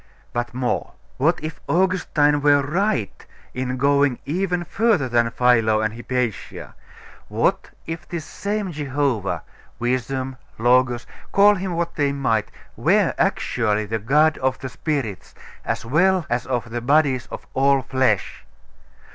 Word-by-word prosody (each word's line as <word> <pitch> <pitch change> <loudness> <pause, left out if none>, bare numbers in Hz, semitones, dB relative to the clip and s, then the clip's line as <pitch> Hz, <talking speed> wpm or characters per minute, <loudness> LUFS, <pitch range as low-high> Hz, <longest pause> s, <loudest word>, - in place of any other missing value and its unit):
But 120 0 -2
more..... 125 -1 -2 0.2
What 155 +7 +2
if 155 +1 -6
Augustine 165 -5 +2
were 145 -1 +4
right 155 - -1 0.3
in 130 0 -3
going 140 -1 +3
even 180 +3 -1
further 200 - +1
than 120 -1 +2
Philo 115 -3 +3
and 110 0 -1
Hypatia? 120 -2 -4 0.5
What - - 0 0.2
if 165 -1 -6
this 170 -3 -4
same 205 0 -3
Jehovah, 140 - -1 0.3
Wisdom, 130 +2 -2 0.2
Logos, 120 +1 +3 0.3
call 205 +1 +6
Him 185 -3 -3
what 170 0 -2
they 145 -2 +2
might, 120 -6 0 0.3
were - - +2
actually 110 -3 +1
the 110 +2 -2
God 150 +8 +3
of 130 0 0
the 130 - -6
spirits, 130 - -4 0.3
as - - -3
well 175 +7 +3
as 120 0 -1
of 120 -2 -2
the 120 0 -3
bodies 135 -1 +2
of - - -8
all 135 0 +3
flesh? 130 -6 0
135 Hz, 135 wpm, -22 LUFS, 120-155 Hz, 0.5 s, call